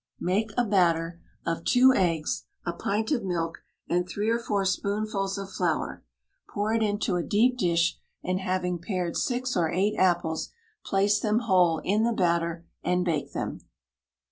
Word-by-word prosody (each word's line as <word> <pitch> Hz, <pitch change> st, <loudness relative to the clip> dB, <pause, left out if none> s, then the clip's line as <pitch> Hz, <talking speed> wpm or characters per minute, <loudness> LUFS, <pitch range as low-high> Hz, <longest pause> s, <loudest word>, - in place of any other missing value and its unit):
Make 200 Hz, +5 st, 0 dB
a 245 Hz, -, +3 dB
batter 170 Hz, -4 st, +1 dB, 0.2 s
of 165 Hz, 0 st, -2 dB
two 260 Hz, +1 st, +6 dB
eggs, 165 Hz, -7 st, 0 dB, 0.2 s
a 175 Hz, -, -1 dB
pint 210 Hz, -, -1 dB
of 250 Hz, -7 st, +1 dB
milk 170 Hz, -3 st, -2 dB, 0.3 s
and 180 Hz, +1 st, 0 dB
three 210 Hz, +4 st, -1 dB
or 230 Hz, -, +1 dB
four 205 Hz, -4 st, -1 dB
spoonfuls 200 Hz, 0 st, -1 dB
of 195 Hz, -1 st, -6 dB
flour; 175 Hz, -5 st, -1 dB, 0.5 s
pour 210 Hz, +2 st, -1 dB
it 225 Hz, -, +1 dB
into 205 Hz, -3 st, 0 dB
a 175 Hz, -, -1 dB
deep 235 Hz, +7 st, +3 dB
dish, 170 Hz, -7 st, +1 dB, 0.2 s
and 185 Hz, +1 st, -1 dB
having 185 Hz, -2 st, -1 dB
pared 175 Hz, -1 st, -3 dB
six 250 Hz, 0 st, -1 dB
or 170 Hz, -3 st, +2 dB
eight 195 Hz, +5 st, +1 dB
apples, 175 Hz, -3 st, +1 dB, 0.3 s
place 200 Hz, +2 st, +2 dB
them 215 Hz, +2 st, +1 dB
whole 180 Hz, -7 st, +3 dB
in 205 Hz, +3 st, +2 dB
the 235 Hz, 0 st, +2 dB
batter, 170 Hz, -3 st, 0 dB, 0.2 s
and 180 Hz, 0 st, +1 dB
bake 160 Hz, -5 st, -1 dB
them. -, -, -3 dB
190 Hz, 165 wpm, -27 LUFS, 170-210 Hz, 0.5 s, two